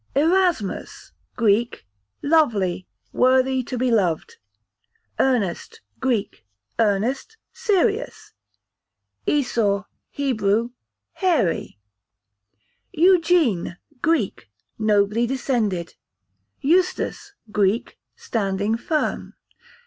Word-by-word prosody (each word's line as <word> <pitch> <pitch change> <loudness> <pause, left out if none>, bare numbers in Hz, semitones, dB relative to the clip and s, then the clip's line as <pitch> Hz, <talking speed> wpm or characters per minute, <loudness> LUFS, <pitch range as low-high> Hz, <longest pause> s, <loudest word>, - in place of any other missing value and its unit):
Erasmus, 330 - 0 0.2
Greek, 225 - +1 0.4
lovely, 215 - +2 0.3
worthy 260 +1 +3
to 250 +1 -5
be 250 0 +1
loved. 180 -8 0 0.8
Ernest, 230 -10 0 0.2
Greek, 240 -6 -1 0.4
earnest, 230 - 0 0.2
serious. 435 0 -1 0.9
Esau, 225 -8 +1 0.3
Hebrew, 230 -4 0 0.4
hairy. 325 - 0 1.1
Eugene, 330 - +3 0.2
Greek, 305 - 0 0.3
nobly 210 +2 +2
descended. 230 -9 -1 0.7
Eustace, 370 +5 0 0.2
Greek, 205 +2 0 0.2
standing 205 0 -1
firm. 305 +5 -2
245 Hz, 65 wpm, -22 LUFS, 205-320 Hz, 1.1 s, worthy